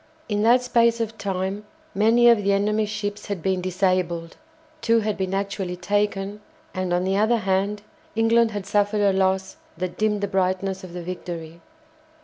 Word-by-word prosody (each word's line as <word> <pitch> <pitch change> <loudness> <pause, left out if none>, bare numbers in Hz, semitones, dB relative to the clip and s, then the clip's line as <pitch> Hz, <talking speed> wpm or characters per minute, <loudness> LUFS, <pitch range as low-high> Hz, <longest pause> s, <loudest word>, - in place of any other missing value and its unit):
In 205 -1 -1
that 240 +3 +4
space 235 -1 +3
of 225 -1 -2
time 195 +1 -2 0.3
many 230 +4 +4
of 230 -3 +5
the 200 0 +2
enemy's 210 +1 +1
ships 205 -1 -4
had 195 -5 -4
been 190 -1 0
disabled, 180 -2 -1 0.5
two 230 0 +3
had 210 -1 -1
been 190 -1 -3
actually 195 -2 -2
taken; 205 +1 -1 0.3
and, 185 -2 -2
on 175 +1 +1
the 190 +1 0
other 220 +3 +3
hand, 200 +1 -1 0.3
England 230 +1 +4
had 205 -3 -5
suffered 205 +1 +1
a 200 -1 +3
loss 190 0 0 0.2
that 180 0 -4
dimmed 210 -1 +1
the 200 - 0
brightness 190 0 -1
of 180 -2 -9
the 175 -1 -6
victory. 170 -2 -7
200 Hz, 170 wpm, -23 LUFS, 185-210 Hz, 0.5 s, of